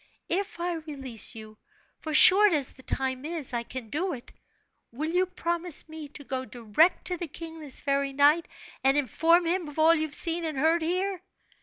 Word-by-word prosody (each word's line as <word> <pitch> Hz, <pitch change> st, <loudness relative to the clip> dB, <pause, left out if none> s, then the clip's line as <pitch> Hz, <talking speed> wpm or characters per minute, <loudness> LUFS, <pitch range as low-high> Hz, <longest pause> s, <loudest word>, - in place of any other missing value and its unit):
If 385 Hz, +1 st, -2 dB
I 350 Hz, +1 st, -2 dB
release 275 Hz, -8 st, -2 dB
you 215 Hz, -1 st, -12 dB, 0.4 s
for 315 Hz, -, -6 dB
short 380 Hz, +5 st, +7 dB
as 285 Hz, -4 st, +1 dB
the 260 Hz, -, -15 dB
time 260 Hz, 0 st, -3 dB
is, 310 Hz, -4 st, -4 dB
I 235 Hz, -, -1 dB
can 235 Hz, -1 st, -8 dB
do 355 Hz, +5 st, -2 dB
it 240 Hz, -, -10 dB, 0.6 s
will 305 Hz, +7 st, -4 dB
you 365 Hz, +2 st, +1 dB
promise 345 Hz, -2 st, 0 dB
me 315 Hz, -1 st, -9 dB
to 285 Hz, 0 st, -12 dB
go 260 Hz, -1 st, -4 dB
direct 245 Hz, -, +1 dB
to 360 Hz, -, -1 dB
the 345 Hz, -, -5 dB
king 325 Hz, +2 st, -9 dB
this 295 Hz, -4 st, -5 dB
very 275 Hz, -1 st, -1 dB
night, 290 Hz, +5 st, +3 dB, 0.4 s
and 270 Hz, +2 st, +3 dB
inform 325 Hz, -, +2 dB
him 345 Hz, 0 st, -1 dB
of 295 Hz, -, -13 dB
all 320 Hz, +1 st, +5 dB
you've 315 Hz, -2 st, -2 dB
seen 335 Hz, 0 st, +2 dB
and 310 Hz, -4 st, -4 dB
heard 320 Hz, +4 st, +2 dB
here?" 365 Hz, +3 st, -1 dB
315 Hz, 190 wpm, -27 LUFS, 270-340 Hz, 0.6 s, short